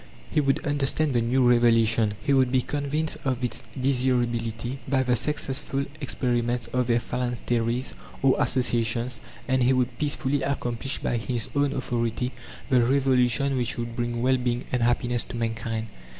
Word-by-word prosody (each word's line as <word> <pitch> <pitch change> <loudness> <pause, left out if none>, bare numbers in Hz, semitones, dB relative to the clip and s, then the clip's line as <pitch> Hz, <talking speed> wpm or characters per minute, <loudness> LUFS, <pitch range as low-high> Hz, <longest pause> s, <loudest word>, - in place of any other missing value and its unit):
He 150 - +2
would 135 -1 0
understand 145 +1 +1
the 120 - +2
new 125 +2 +2
revelation; 115 -3 +4
he 140 - +2
would 130 -2 +3
be 130 -1 +2
convinced 145 +2 -2
of 130 -2 -1
its 125 - 0 0.2
desirability 120 -2 0
by 130 -1 +2
the 125 -1 +2
successful 135 0 -1
experiments 120 -3 -1
of 125 -1 +1
their 120 -1 +3
phalansteries, 120 0 -2 0.3
or 135 -1 +5
associations; 120 -1 +1 0.3
and 130 0 +1
he 125 +2 +4
would 125 -1 -1
peacefully 145 -1 0
accomplish 135 -2 -1
by 120 - -1
his 115 -1 -2
own 140 -1 +2
authority 120 -2 -2 0.4
the 130 -2 +4
revolution 130 +1 +2
which 120 -1 0
would 120 0 -4
bring 120 -1 -2
well 130 0 +3
being 125 -1 -2
and 125 - 0
happiness 120 0 +1
to - - -8
mankind. 115 -1 -3
125 Hz, 155 wpm, -25 LUFS, 120-135 Hz, 0.4 s, or